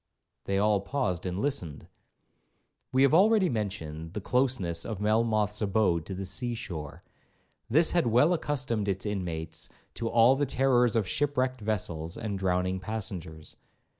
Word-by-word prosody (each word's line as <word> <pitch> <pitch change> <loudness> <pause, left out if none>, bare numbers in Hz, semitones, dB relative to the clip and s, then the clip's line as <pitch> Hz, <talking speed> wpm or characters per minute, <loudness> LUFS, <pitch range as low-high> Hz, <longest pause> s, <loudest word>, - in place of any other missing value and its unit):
They 100 - 0
all 105 0 +2
paused 100 -6 -2
and 90 0 -3
listened. 100 - -2 1.0
We 130 +1 +4
have 140 - +4
already 200 +1 +5
mentioned 80 - -4
the - - -3
closeness 100 -8 0
of 110 -4 -5
Melmoth's 110 0 +1
abode 100 -5 +1
to 95 - -5
the 95 +1 -5
sea 120 +5 -1
shore. 80 - -7 0.7
This 160 +7 +4
had 175 -7 +2
well 125 +9 +4
accustomed 130 - -1
its 95 +1 -2
inmates 85 -5 -4 0.2
to 115 - -3
all 120 +3 +5
the 145 +1 0
terrors 125 -3 +3
of 110 -4 +1
shipwrecked 130 -3 0
vessels 85 -6 -3
and 105 -4 -4
drowning 90 0 0
passengers. 95 -6 -5
105 Hz, 145 wpm, -28 LUFS, 90-125 Hz, 1.0 s, already